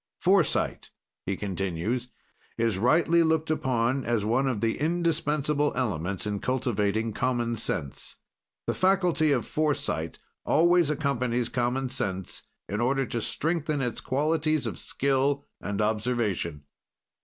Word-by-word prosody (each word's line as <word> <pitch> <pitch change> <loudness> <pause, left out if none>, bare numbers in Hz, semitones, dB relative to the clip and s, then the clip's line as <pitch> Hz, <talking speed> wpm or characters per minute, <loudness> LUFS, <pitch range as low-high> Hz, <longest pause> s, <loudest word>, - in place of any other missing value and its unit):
"Foresight," 185 -3 +2 0.4
he 95 0 -1
continues, 95 +5 -2 0.5
"is 115 -4 +1
rightly 165 - +4
looked 160 -1 +2
upon 130 -2 +1
as 115 -3 0
one 125 +5 +2
of 125 -5 0
the 115 +1 0
indispensable 150 -3 +1
elements 100 -7 -1
in 105 -1 -2
cultivating 110 -3 0
common 120 -1 0
sense. 80 -10 -4 0.5
"The - - 0
faculty 180 -5 +3
of 125 -4 +1
foresight 145 - -1 0.3
always 170 0 +4
accompanies 125 -5 0
common 125 +1 0
sense, 95 -5 -3 0.3
in 105 +3 -2
order 135 +2 +2
to 120 -1 -3
strengthen 155 +2 -1
its 125 -3 -2
qualities 155 +2 +1
of - - -4
skill 140 +1 0 0.2
and 105 0 -3
observation. 105 -8 -1
125 Hz, 120 wpm, -27 LUFS, 110-150 Hz, 0.5 s, rightly